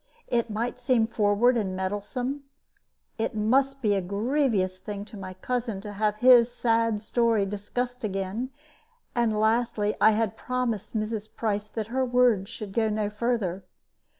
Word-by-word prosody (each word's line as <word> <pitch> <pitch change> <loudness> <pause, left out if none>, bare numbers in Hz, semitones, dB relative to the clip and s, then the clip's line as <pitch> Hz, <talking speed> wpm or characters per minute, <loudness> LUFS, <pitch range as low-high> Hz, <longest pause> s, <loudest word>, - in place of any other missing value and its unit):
It 235 -1 0
might 230 +4 -3
seem 245 -3 +3
forward 220 +2 +3
and 190 -4 -1
meddlesome; 205 +9 -3 0.8
it 220 - -1
must 270 +5 +1
be 210 -2 +3
a 195 - +1
grievous 200 -1 0
thing 200 +1 -6
to 220 - -12
my 185 -2 -7
cousin 235 +1 -2
to 205 0 -7
have 210 +1 0
his 245 +1 +6
sad 230 -2 +1
story 230 -2 +2
discussed 245 +5 -4
again; 195 +4 -2 0.6
and 225 -3 +1
lastly, 220 -1 +1
I 220 +1 +7
had 220 -2 0
promised 235 -4 -2
Mrs. 215 0 -3
Price 210 -2 -2
that 220 -1 -4
her 265 0 +2
words 245 -6 +3
should 205 -3 -7
go 220 0 +2
no 210 -1 -1
further. 210 -5 -1
220 Hz, 150 wpm, -27 LUFS, 205-245 Hz, 0.8 s, I